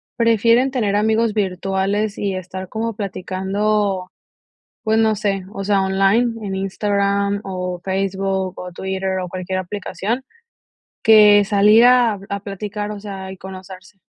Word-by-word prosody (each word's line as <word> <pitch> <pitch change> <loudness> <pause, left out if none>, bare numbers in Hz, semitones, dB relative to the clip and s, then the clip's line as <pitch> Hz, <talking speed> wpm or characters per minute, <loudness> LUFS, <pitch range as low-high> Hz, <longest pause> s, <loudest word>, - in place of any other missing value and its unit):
prefieren 230 +2 +3
tener 215 -6 0
amigos 220 +1 +2
virtuales 195 +1 -1
y 200 -1 -1
estar 185 0 -7
como 225 +1 -3
platicando, 195 0 -1 0.7
pues, 220 0 +1
no 220 -1 +3
sé, 200 -2 -2
o 195 - -5
sea, 200 -1 +2
online, 205 +4 +1
en 195 -1 -3
Instagram, 200 +1 0
o 180 -2 -4
Facebook, 190 -1 -2
o 180 -1 -7
Twitter, 190 0 -3
o 180 - -4
cualquier 185 +1 -4
aplicación, 205 +6 -4 0.8
que 210 -2 +7
salir 210 +3 +5
a 245 -4 +5
a 200 0 -3
platicar, 205 +1 -5
o 210 - -5
sea, 195 -2 -7
y 190 - -8
conocerse. 190 +1 -11
200 Hz, 135 wpm, -20 LUFS, 190-215 Hz, 0.8 s, que